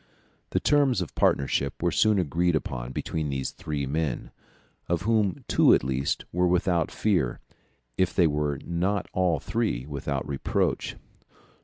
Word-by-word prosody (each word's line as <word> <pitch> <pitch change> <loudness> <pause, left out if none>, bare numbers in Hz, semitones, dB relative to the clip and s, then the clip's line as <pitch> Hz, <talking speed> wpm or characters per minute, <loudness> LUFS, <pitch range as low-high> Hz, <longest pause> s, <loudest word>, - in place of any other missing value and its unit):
The - - +1
terms 140 -8 +3
of 85 - -10
partnership 70 0 +1
were 85 0 +1
soon 110 -1 +3
agreed 85 0 +1
upon 65 -4 -3
between 75 +3 -3
these 65 -1 -2
three 75 -2 -4
men, 75 -1 -2 0.6
of 85 -1 0
whom 110 -4 +1
two - - +5
at - - -1
least 65 +1 -1
were 90 +1 +2
without 90 -2 +1
fear, 90 - 0 0.6
if 95 -1 +3
they 90 - +5
were 75 -2 0
not 90 +4 -1
all 90 -5 +2
three 105 - -1
without 70 -2 -3
reproach. 70 -1 -1
85 Hz, 145 wpm, -26 LUFS, 70-95 Hz, 0.6 s, two